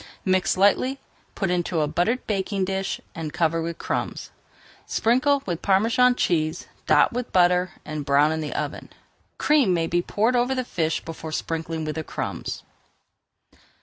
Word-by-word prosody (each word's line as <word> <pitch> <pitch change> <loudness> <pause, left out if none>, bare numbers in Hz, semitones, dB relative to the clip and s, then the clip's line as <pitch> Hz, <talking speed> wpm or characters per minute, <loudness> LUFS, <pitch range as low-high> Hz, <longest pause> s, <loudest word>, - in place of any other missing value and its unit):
Mix 185 -2 +2
lightly, 255 +8 +3 0.4
put 195 -3 -1
into 175 -2 0
a 150 - +1
buttered 220 +11 0
baking 195 -1 -1
dish, 195 0 -2 0.3
cover 165 0 +1
with 165 0 -4
crumbs, - - -3 0.6
sprinkle 265 +5 +2
with 175 -3 -3
Parmesan 230 +6 +3
cheese, 160 -5 0 0.2
dot - - +4
with 245 0 -4
butter, 180 -1 +3
and 155 -1 -4
brown 140 +2 +3
in 160 0 -2
the 150 - -4
oven. - - -4 0.5
Cream 280 -12 +3
may 165 -1 +1
be 175 +1 +1
poured 220 +7 +1
over 245 +2 +2
the 255 -1 -2
fish 160 -7 -1
before 160 -1 -7
sprinkling 160 0 -3
with 155 - -2
the 160 - -4
crumbs. - - -5
180 Hz, 150 wpm, -24 LUFS, 160-225 Hz, 0.6 s, dot